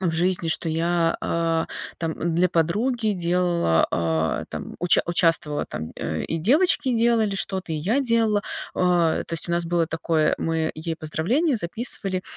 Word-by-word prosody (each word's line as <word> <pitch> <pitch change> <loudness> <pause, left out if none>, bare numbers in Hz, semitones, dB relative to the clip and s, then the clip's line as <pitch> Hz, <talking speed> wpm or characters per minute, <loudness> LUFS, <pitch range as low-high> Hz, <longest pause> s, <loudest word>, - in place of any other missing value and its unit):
в 185 -3 0
жизни, 175 0 0
что 160 +1 0
я, 165 +1 +1
а, 165 -1 0 0.3
там, 165 -1 -2
э, - - -7
для 170 +2 +2
подруги 215 +8 0
делала, 175 - +1
а, 80 -1 -1
там - - -7
уча 175 0 +4
участвовала 165 -4 +2
там, 80 0 -6
э, - - -3
и 165 - -3
девочки 265 - +3
делали 225 -3 +2
что-то, 190 -3 -3
и - - -1
я 205 - 0
делала. 230 -5 +2 0.3
А 175 -3 +2
то - - -11
есть, 165 - -2
у 170 - -1
нас 170 0 0
было 170 -1 +1
такое, 160 -1 0
э, - - +1
мы 160 -1 -1
ей 160 +1 -4
поздравления 225 - 0
записывали 195 -1 0
170 Hz, 170 wpm, -23 LUFS, 160-200 Hz, 0.3 s, уча